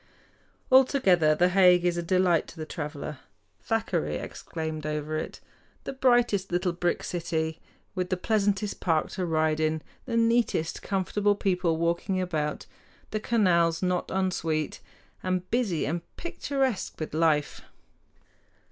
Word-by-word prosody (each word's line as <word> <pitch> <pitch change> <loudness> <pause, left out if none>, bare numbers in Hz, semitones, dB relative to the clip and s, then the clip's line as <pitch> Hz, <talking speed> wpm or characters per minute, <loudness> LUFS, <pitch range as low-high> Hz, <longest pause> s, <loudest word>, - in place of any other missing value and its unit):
Altogether 195 - +5
The 180 +3 +3
Hague 180 -1 +5
is 175 -1 +2
a 175 - -1
delight 180 -1 +2
to - - -12
the 155 - -5
traveler. 150 -2 -6 0.4
Thackeray 220 -7 -1
exclaimed 160 -1 -5
over 150 0 -3
it, 155 - -4 0.4
"The - - -5
brightest 240 -7 +2
little 175 0 0
brick 175 0 -1
city, 160 -2 -2 0.3
with 185 -2 -2
the 185 - 0
pleasantest 205 0 0
park 160 -3 +1
to 185 -2 -3
ride 155 -1 +1
in, 155 0 0 0.2
the 235 -2 -1
neatest, 230 -8 +1
comfortable 205 +1 0
people 180 -5 0
walking 170 +3 0
about, 155 -5 -2 0.5
the 215 - -1
canals 175 -7 +2
not 180 -1 0
unsweet, 165 -5 -1 0.4
and 185 0 -1
busy 220 -10 +1
and 170 +4 -2 0.2
picturesque 270 - -2
with 155 - -5
life!" 155 -2 +1
180 Hz, 130 wpm, -27 LUFS, 160-200 Hz, 0.5 s, Altogether